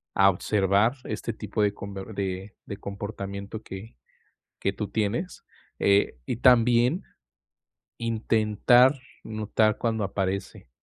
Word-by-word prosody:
a 95 0 +6
observar 100 +3 +2
este 115 - -4
tipo 105 0 -3
de 100 -1 +2
com 100 0 -8
de 95 0 -5
de 100 - -6
comportamiento 100 +1 -6
que 95 +4 -9 0.7
que - - 0
tú - - -4
tienes, 110 - -2 0.4
eh, 100 -9 +3
y - - -2
también, 125 +5 +4 1.0
intentar 115 +3 +3 0.3
notar 110 0 +1
cuándo 110 -3 -1
aparece, 95 -5 -3
105 Hz, 110 wpm, -26 LUFS, 100-115 Hz, 1.0 s, a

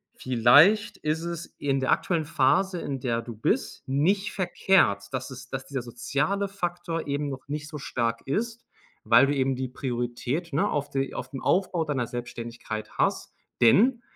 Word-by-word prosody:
vielleicht 145 - +5
ist 155 +1 -1
es 170 -1 -5
in 135 -1 0
der 130 - +1
aktuellen 165 -4 +1
Phase, 170 +7 +2
in 135 -2 -3
der 115 -2 0
du 115 -1 -8
bist, 110 - -1
nicht 180 +10 +1
verkehrt, 185 - +2
dass 130 +1 -4
es 130 +1 -10
dass 135 0 -5
dieser 135 -3 -3
soziale 150 - -1
Faktor 175 -4 -4
eben 145 +1 -1
noch 135 0 -7
nicht 150 +1 -4
so 150 - -6
stark 115 -3 -2
ist, 230 - -2 0.4
weil 120 +5 +6
du 145 - 0
eben 135 -1 +1
die 130 0 -3
Priorität, 125 +5 -3
ne, 150 - +2
auf 145 -1 -2
die 135 0 -1
auf 125 - -5
dem 135 - -6
Aufbau 180 -3 +1
deiner 130 -6 -1
Selbstständigkeit 115 -2 -6
hast. - - 0 0.3
Denn, 235 - +5
140 Hz, 170 wpm, -26 LUFS, 125-170 Hz, 0.4 s, weil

